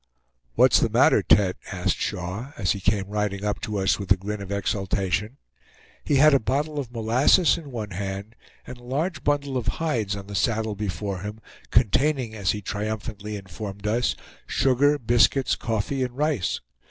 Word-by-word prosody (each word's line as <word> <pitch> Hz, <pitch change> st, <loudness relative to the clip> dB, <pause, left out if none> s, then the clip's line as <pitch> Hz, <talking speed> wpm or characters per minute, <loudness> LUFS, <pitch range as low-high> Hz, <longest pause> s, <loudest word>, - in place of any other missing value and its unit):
"What's -, -, +6 dB
the -, -, +2 dB
matter, -, -, +4 dB
Tete?" 95 Hz, -2 st, +3 dB
asked -, -, -1 dB
Shaw, 95 Hz, +10 st, -4 dB
as 95 Hz, -, +1 dB
he 100 Hz, -, -1 dB
came 100 Hz, +1 st, +1 dB
riding 105 Hz, -1 st, -2 dB
up 105 Hz, -, -2 dB
to 105 Hz, -1 st, -3 dB
us 95 Hz, +1 st, +1 dB
with 100 Hz, -2 st, -6 dB
a 95 Hz, -, +7 dB
grin 105 Hz, +2 st, -5 dB
of 100 Hz, 0 st, -7 dB
exultation. 100 Hz, +2 st, -1 dB, 0.7 s
He 145 Hz, -, +1 dB
had 150 Hz, +2 st, +6 dB
a 140 Hz, -, +5 dB
bottle 145 Hz, +5 st, -1 dB
of 125 Hz, -4 st, -5 dB
molasses 125 Hz, +9 st, +4 dB
in 160 Hz, -4 st, -8 dB
one 110 Hz, -4 st, -5 dB
hand, 100 Hz, +4 st, -5 dB, 0.3 s
and 125 Hz, 0 st, -9 dB
a -, -, -17 dB
large 145 Hz, +5 st, -2 dB
bundle 140 Hz, -2 st, 0 dB
of 120 Hz, -2 st, -4 dB
hides 115 Hz, -11 st, -1 dB
on 100 Hz, -1 st, -7 dB
the 100 Hz, -, -9 dB
saddle 110 Hz, +3 st, 0 dB
before 100 Hz, -1 st, -3 dB
him, 105 Hz, +3 st, -6 dB, 0.3 s
containing, 125 Hz, +2 st, +2 dB
as 100 Hz, -4 st, -2 dB
he 105 Hz, -1 st, -1 dB
triumphantly 105 Hz, +1 st, -4 dB
informed 100 Hz, +1 st, -7 dB
us, 115 Hz, +3 st, +1 dB, 0.3 s
sugar, 140 Hz, +3 st, +3 dB
biscuits, 120 Hz, +1 st, +3 dB
coffee, 115 Hz, +4 st, -2 dB
and 125 Hz, 0 st, -3 dB
rice. 145 Hz, -, 0 dB
110 Hz, 175 wpm, -25 LUFS, 100-130 Hz, 0.7 s, a